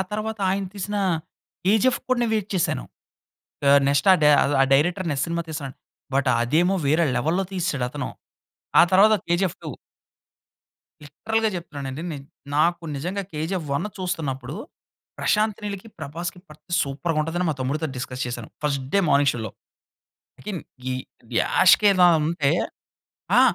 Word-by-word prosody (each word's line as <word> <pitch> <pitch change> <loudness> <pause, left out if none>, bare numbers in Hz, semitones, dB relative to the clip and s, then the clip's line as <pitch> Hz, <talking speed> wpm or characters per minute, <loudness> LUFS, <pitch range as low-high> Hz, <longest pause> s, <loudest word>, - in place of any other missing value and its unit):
తర్వాత 215 +1 -3
ఆయన 195 +1 -1
తీసిన 205 +1 -4 0.7
కేజీఎఫ్‌కి 220 +6 +2
కూడా 255 - +3
నేను 230 -2 0
వెయిట్ 210 -2 -2
చేశాను. 180 - 0 0.9
ఆహ్, 140 0 +7
నెక్స్ట్ 140 +6 +2
ఆ - - +8
డై 150 - +7 0.3
ఆ - - +7
డైరెక్టర్ 175 +6 +2
అనే 145 - -1
సినిమా 170 0 -2
తీస్తానాడు. 145 -4 -6 0.4
బట్ 135 0 +2
అదేమో 160 +10 +2
వేరే 160 +4 +3
లెవెల్‌లో 165 +8 0
తీసాడు 165 -9 -1
అతను. 145 -1 -4 0.7
ఆ - - +9
తర్వాత 205 +4 +6
కేజీఎఫ్ 175 +1 0
2. - - -5 1.3
లిటరల్‌గా 220 +10 -1
చెప్తున్నాను 145 -6 -6
అండి. 135 +5 -6
నేన్ 140 -2 -7 0.3
నాకు 170 +3 +2
నిజంగా 180 +8 -3
'కేజీఎఫ్ 160 +2 -3
1' 210 +9 -3
చూస్తున్నప్పుడు, 150 -7 -3 0.6
ప్రశాంత్ 215 -1 +1
నీల్‌కి, 200 +1 -5
ప్రభాస్‌కి 170 +4 -6
పడితే 150 +3 -18
సూపర్‌గా 150 +4 -2
ఉంటది 165 +3 -3
అని, 180 - +1
మా - - -2
తమ్ముడితో 150 +5 -1
డిస్కస్ 125 0 -4
చేశాను. 120 -2 -6 0.2
ఫస్ట్ 140 -2 0
డే 200 - +5
మార్నింగ్ 140 -1 +4
షోలో. 110 -3 -5 0.9
ఇకిన్ 195 -6 -5 0.3
ఈ - - 0 0.5
యాష్ - - +6
కే 205 - +6
దానంటే, 160 -4 +4 0.9
ఆ! - - +8
165 Hz, 145 wpm, -24 LUFS, 140-190 Hz, 1.3 s, ఆ